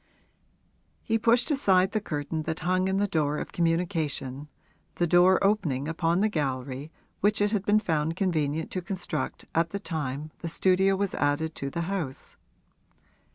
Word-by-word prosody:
He 225 0 +1
pushed 235 +5 +3
aside 190 -10 +3
the 215 - 0
curtain 155 -3 -3
that 160 -1 -3
hung 185 +2 +1
in 190 0 +1
the 205 - +2
door 150 -5 0
of - - -5
communication 160 -5 -1 0.5
the 175 - +1
door 180 +2 +5
opening 165 -10 +1
upon 165 +2 +1
the 215 - +4
gallery 140 -4 -3 0.3
which 210 +2 +2
it 205 0 +2
had 205 -3 -1
been 205 +1 +5
found 160 -5 -1
convenient 160 -4 -1
to 185 - -2
construct 175 -6 -4
at 165 0 +2
the 200 - -4
time 155 -4 -4
the 170 - -4
studio 190 +3 +3
was 200 0 -1
added 145 +3 0
to 140 - -4
the 170 - -3
house. 170 -7 -4
170 Hz, 160 wpm, -27 LUFS, 150-195 Hz, 0.5 s, door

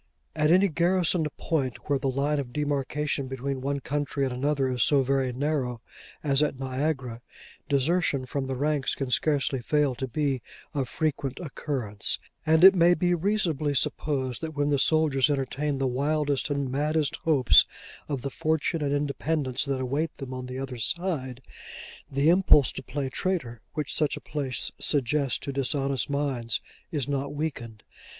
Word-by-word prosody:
At 150 -1 +2
any 185 +4 +5
garrisoned 175 -1 +2
point 135 -7 -2
where 140 -2 +1
the 135 - 0
line 140 +3 0
of 130 -3 -5
demarcation 145 0 -1
between 135 +1 -3
one 140 +1 -1
country 145 +1 -2
and 130 - -2
another 135 +1 0
is 125 -2 -1
so 140 -2 +4
very 135 -1 +1
narrow 130 -2 -1 0.4
as 140 -1 +2
at 150 -3 0
Niagara, 130 -2 -2 0.5
desertion 140 -1 +1
from 135 +1 -3
the 135 - -2
ranks 145 +1 0
can 135 -2 -4
scarcely 140 -1 +1
fail 145 +2 +2
to 130 +1 -4
be 135 0 -1 0.3
of 135 -4 -2
frequent 140 -3 -2
occurrence: 130 - -2 0.3
and 160 +2 +4
it 190 +1 +11
may 175 -1 +5
be 175 +1 +1
reasonably 170 -6 0
supposed 135 -3 -1
that 160 -1 -5
when 145 0 +1
the 140 - +2
soldiers 150 -3 +3
entertain 140 +1 -1
the 135 - 0
wildest 145 +2 0
and 140 -2 -1
maddest 150 +2 0
hopes 145 -6 +5 0.4
of 140 -4 -3
the 140 - -3
fortune 160 +3 0
and 145 -1 0
independence 145 -1 -1
that 135 -2 -1
await 145 +5 -2
them 135 -2 -6
on 130 0 -5
the 125 0 -6
other 130 -2 -5
side, 130 - -2 0.7
the 140 +2 +1
impulse 175 -6 +5
to - - -6
play 135 +1 -3
traitor, 130 - -2
which 150 -3 -2
such 150 -2 +1
a - - -6
place 135 -5 -3
suggests 140 -1 +1
to 140 - -5
dishonest 135 -1 0
minds, 135 -6 -1 0.3
is 145 -7 -1
not 140 0 -2
weakened. 125 -8 -4
140 Hz, 165 wpm, -27 LUFS, 130-150 Hz, 0.7 s, it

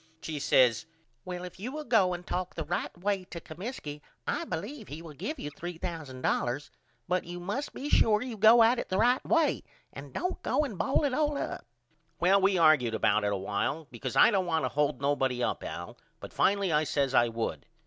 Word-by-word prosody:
She 155 -2 -5
says 125 -2 +3 0.4
Well 180 -1 -5
if 180 0 -9
you 235 +6 -4
will 305 +2 -5
go 205 -9 +3
and 175 0 -10
talk 180 0 -3
the 160 - -3
right 175 +3 -3
way 195 +1 -1
to 170 - -8
Comiskey 155 - -7 0.2
I - - -1
believe 205 - -5
he 150 - -7
will 160 -2 -10
give 305 - -5
you 145 - -6
$3000 150 -6 -3 0.4
but 180 0 +1
you 175 +1 -7
must 205 +11 -3
be 280 - -6
sure 220 -6 +4
you 250 -3 -5
go 220 +3 +7
at 235 +2 +4
it - - -5
the 185 - 0
right 245 +4 +3
way 330 -3 +2 0.3
and - - -9
don't 365 +1 -3
go 300 - +1
and 235 -8 -6
ball 270 - +1
it 280 -3 +1
all 295 +1 +1
up. - - -5 0.5
Well 190 +3 +4
we 195 0 +3
argude 155 -9 +4
about 105 -1 +2
it 100 - +1
a 100 - 0
while 100 +11 -2
because 120 -3 -5
I - - +7
don't 190 -4 +1
want 160 -2 +1
to - - -1
hold 145 -1 0
nobody 135 -3 +1
up - - -1
Al - - -7 0.2
but - - -10
finally 200 -2 +2
I 150 +1 +3
says 140 -3 0
I 120 -2 +5
would. 115 -10 -4
175 Hz, 210 wpm, -29 LUFS, 145-220 Hz, 0.5 s, go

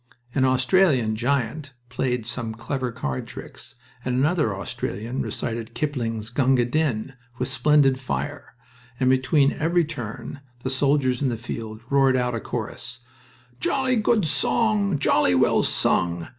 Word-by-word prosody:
An 130 -2 +2
Australian 130 - +3
giant 135 +4 -1 0.2
played 125 -2 -1
some 115 -2 -3
clever 125 +2 -3
card 70 - -4
tricks, - - -10 0.3
and 125 -1 -1
another 150 - +2
Australian 105 +5 -4
recited 115 0 -4
Kipling's 115 -7 -2
"Gunga 130 -1 +3
Din" 135 -2 -1 0.2
with 125 - -1
splendid 145 -3 +3
fire. 145 0 -4 0.4
And 130 0 +4
between 135 +2 +3
every 170 +2 +1
"turn" 135 -2 -7 0.2
the 130 - -1
soldiers 130 -1 +2
in 135 - +2
the 120 - -2
field 110 -1 -6
roared 135 -1 +4
out 125 -1 0
a 115 - -1
chorus: 115 +2 -5 0.6
"Jolly 260 - +1
good 215 -3 +2
song, 205 +2 +1
Jolly 100 -10 +3
well - - +4
sung. 85 -1 +1
130 Hz, 135 wpm, -24 LUFS, 115-145 Hz, 0.6 s, And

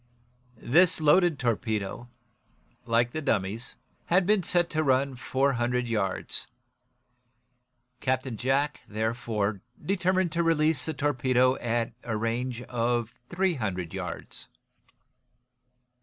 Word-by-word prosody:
This 165 +11 +4
loaded 160 +1 +4
torpedo, 110 -2 -2 0.8
like 115 +1 +2
the 155 - -3
dummies, 110 -3 -1 0.3
had 180 +2 +3
been 210 0 +3
set 175 0 +2
to 155 - +1
run 135 -1 +2
four 135 +3 +1
hundred 120 0 0
yards. 105 -5 -2 1.5
Captain 130 -1 -1
Jack, 135 +5 0
therefore, 110 -2 -2 0.2
determined 185 -2 +1
to 170 - 0
release 160 -4 +2
the 160 - -3
torpedo 130 -3 +2
at 115 0 -1
a 115 -3 -2
range 120 +2 -2
of 120 -1 -1 0.2
three 185 +1 +1
hundred 95 - -3
yards. 90 -3 -6
125 Hz, 110 wpm, -27 LUFS, 115-155 Hz, 1.5 s, This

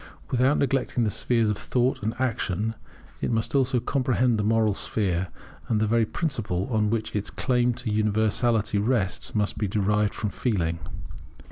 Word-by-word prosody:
Without 130 +3 +3
neglecting 135 -3 +1
the 110 - +1
spheres 115 +2 +1
of 100 - -3
Thought 125 +1 0
and 110 +2 -2
Action 110 -4 -1 0.5
it - - 0
must 115 -1 -1
also 130 -2 +2
comprehend 125 -2 +1
the - - +1
moral 110 0 +3
sphere; 95 -3 -1 0.4
and 110 - +1
the 110 - +2
very 115 0 +2
principle 110 - -2
on 105 -2 +2
which 110 -1 -2
its 105 -1 -2
claim 125 -1 +1
to 120 -3 -3
universality 110 0 +1
rests 105 -3 0
must 105 -1 0
be 105 - 0
derived 105 +1 +1
from 105 -2 -2
Feeling. 85 -9 -1
110 Hz, 160 wpm, -26 LUFS, 105-125 Hz, 0.5 s, Without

